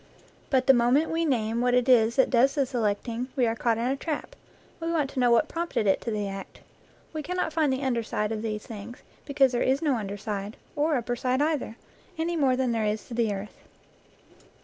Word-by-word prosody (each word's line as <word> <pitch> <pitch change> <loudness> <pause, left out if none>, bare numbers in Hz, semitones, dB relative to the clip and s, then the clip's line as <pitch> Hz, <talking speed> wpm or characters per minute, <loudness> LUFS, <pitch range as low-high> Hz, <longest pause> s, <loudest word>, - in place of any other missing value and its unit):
But 260 -2 +2
the 270 - +7
moment 250 +6 +3
we 330 +1 0
name 230 -5 0
what 245 0 +2
it 250 0 +2
is 235 -2 +5
that 265 - +3
does 260 +3 +4
the 280 -2 +2
selecting, 235 0 -2
we 255 - +3
are 225 0 0
caught 230 -1 +1
in 230 - -1
a 260 +2 +1
trap 300 +2 -5 0.4
we 330 0 -2
want 300 -5 0
to - - -4
know 245 -1 +4
what 235 +6 +4
prompted 335 -10 -2
it 195 - +2
to - - -4
the 210 -2 -2
act. 195 0 -8 0.5
We 310 - -3
cannot 340 +1 -2
find 310 -3 +2
the 260 +1 -2
under 245 -3 +1
side 210 -1 -2
of 220 -1 -3
these 215 -1 -4
things, 225 +2 -9 0.2
because 275 -2 +3
there 245 - -1
is 265 +1 +2
no 290 -6 +1
under 205 -2 -4
side, 205 0 -5 0.2
or 300 +1 +1
upper 245 -1 -1
side 255 +1 0
either, 295 -6 0 0.4
any 335 +2 -1
more 270 -5 +3
than 255 -1 0
there 225 -2 0
is 210 +1 -2
to - - -7
the 230 -2 +1
earth. 200 +1 -6
245 Hz, 225 wpm, -27 LUFS, 225-280 Hz, 0.5 s, the